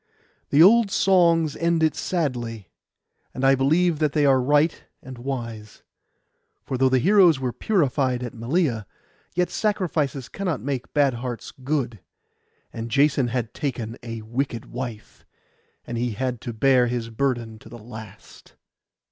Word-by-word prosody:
The 145 Hz, +3 st, +6 dB
old 225 Hz, +3 st, +6 dB
songs 170 Hz, -6 st, +3 dB
end 165 Hz, -1 st, +1 dB
it 155 Hz, -, +3 dB
sadly, 120 Hz, -, -3 dB, 0.6 s
and 130 Hz, -, -1 dB
I 135 Hz, -, +6 dB
believe 155 Hz, +5 st, +2 dB
that 150 Hz, -2 st, +1 dB
they 150 Hz, -2 st, +2 dB
are 135 Hz, -2 st, +4 dB
right 150 Hz, +4 st, +2 dB, 0.2 s
and 130 Hz, -2 st, -10 dB
wise; 115 Hz, -5 st, -6 dB, 0.8 s
for -, -, -4 dB
though 130 Hz, +1 st, +3 dB
the 130 Hz, -, +3 dB
heroes 175 Hz, -, +5 dB
were 125 Hz, -2 st, -2 dB
purified 135 Hz, -, 0 dB
at 120 Hz, -, -5 dB
Malea, 120 Hz, -, -1 dB, 0.5 s
yet 180 Hz, 0 st, +1 dB
sacrifices 160 Hz, -, -1 dB
cannot 180 Hz, -9 st, -3 dB
make 130 Hz, +2 st, -4 dB
bad 140 Hz, -3 st, +3 dB
hearts 120 Hz, 0 st, -6 dB
good, 130 Hz, -5 st, -3 dB, 0.7 s
and 115 Hz, +1 st, -5 dB
Jason 140 Hz, 0 st, +3 dB
had 120 Hz, -2 st, -3 dB
taken 120 Hz, -6 st, -4 dB
a 115 Hz, -2 st, -7 dB
wicked 120 Hz, +1 st, -3 dB
wife, 120 Hz, -3 st, -7 dB, 0.6 s
and 120 Hz, -1 st, -4 dB
he 120 Hz, -1 st, -1 dB
had 125 Hz, +1 st, -3 dB
to 120 Hz, -, -5 dB
bear 125 Hz, +2 st, +3 dB
his 120 Hz, -1 st, -3 dB
burden 115 Hz, -3 st, -2 dB
to 110 Hz, -, -15 dB
the 120 Hz, -, -10 dB
last. 110 Hz, -3 st, -12 dB
130 Hz, 145 wpm, -24 LUFS, 120-150 Hz, 0.8 s, The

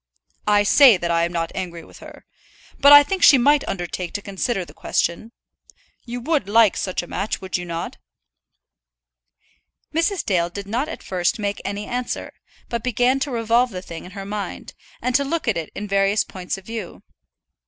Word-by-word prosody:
"I 205 Hz, -1 st, +4 dB
say 245 Hz, +1 st, +7 dB
that 170 Hz, -1 st, -2 dB
I 170 Hz, 0 st, +2 dB
am 170 Hz, -, -4 dB
not 165 Hz, -1 st, -2 dB
angry 175 Hz, -3 st, -5 dB
with -, -, -15 dB
her. -, -, -13 dB, 0.5 s
But 285 Hz, -, +7 dB
I 290 Hz, 0 st, +11 dB
think 375 Hz, +5 st, -3 dB
she 280 Hz, -, +8 dB
might 285 Hz, +3 st, +4 dB
undertake 175 Hz, -1 st, -4 dB
to 205 Hz, -, -3 dB
consider 195 Hz, 0 st, -2 dB
the -, -, -15 dB
question. 170 Hz, +7 st, -2 dB, 0.7 s
You 245 Hz, 0 st, -5 dB
would 285 Hz, -, 0 dB
like 220 Hz, -1 st, +5 dB
such 185 Hz, -2 st, -2 dB
a -, -, -10 dB
match, 195 Hz, +5 st, -3 dB
would 190 Hz, -1 st, -5 dB
you 180 Hz, -, -2 dB
not?" 170 Hz, -1 st, -5 dB, 2.0 s
Mrs. 335 Hz, +4 st, 0 dB
Dale 175 Hz, -3 st, +1 dB
did 200 Hz, +3 st, -7 dB
not 245 Hz, +9 st, -2 dB
at -, -, -8 dB
first 180 Hz, +2 st, -1 dB
make 205 Hz, -1 st, -3 dB
any 205 Hz, +1 st, -4 dB
answer, 250 Hz, 0 st, -4 dB, 0.3 s
but 235 Hz, -2 st, -4 dB
began 250 Hz, +2 st, +2 dB
to 280 Hz, -, -2 dB
revolve 235 Hz, 0 st, +2 dB
the 185 Hz, -4 st, -7 dB
thing 165 Hz, -2 st, -8 dB
in 180 Hz, -, -11 dB
her 195 Hz, -, -6 dB
mind, 205 Hz, 0 st, -6 dB, 0.3 s
and 250 Hz, -, 0 dB
to 280 Hz, +3 st, +3 dB
look 310 Hz, +1 st, -3 dB
at 225 Hz, -, +2 dB
it 165 Hz, -2 st, -5 dB
in 210 Hz, -, -5 dB
various 200 Hz, +1 st, +2 dB
points 185 Hz, 0 st, -5 dB
of 195 Hz, -, -13 dB
view. 225 Hz, -5 st, -7 dB
205 Hz, 190 wpm, -22 LUFS, 180-245 Hz, 2.0 s, I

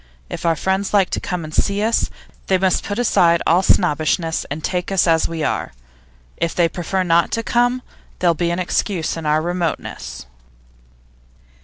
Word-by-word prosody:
If -, -, -3 dB
our 165 Hz, -, +3 dB
friends 190 Hz, +4 st, -1 dB
like 195 Hz, -3 st, +3 dB
to -, -, -1 dB
come 180 Hz, -3 st, -4 dB
and 155 Hz, 0 st, -8 dB
see 200 Hz, +5 st, +1 dB
us, 225 Hz, +1 st, +1 dB, 0.4 s
they 190 Hz, -, +3 dB
must 185 Hz, -1 st, +1 dB
put 205 Hz, -, -4 dB
aside 170 Hz, -8 st, +3 dB
all 175 Hz, +3 st, +4 dB
snobbishness, 165 Hz, -2 st, +1 dB
and 150 Hz, +2 st, -5 dB
take 180 Hz, 0 st, -2 dB
us 190 Hz, -2 st, +3 dB
as 165 Hz, -2 st, +3 dB
we 165 Hz, -2 st, -4 dB
are. -, -, -2 dB, 0.6 s
If 170 Hz, -, -1 dB
they 170 Hz, -1 st, +3 dB
prefer 180 Hz, +3 st, -2 dB
not 170 Hz, -1 st, +3 dB
to 230 Hz, -, -1 dB
come, 245 Hz, +2 st, +1 dB, 0.3 s
there'll 175 Hz, -2 st, +3 dB
be 170 Hz, +1 st, -1 dB
an 170 Hz, -, -1 dB
excuse 180 Hz, -1 st, -1 dB
in 165 Hz, -2 st, -5 dB
our 155 Hz, +1 st, +2 dB
remoteness. 175 Hz, -, -4 dB
175 Hz, 175 wpm, -20 LUFS, 165-195 Hz, 0.6 s, all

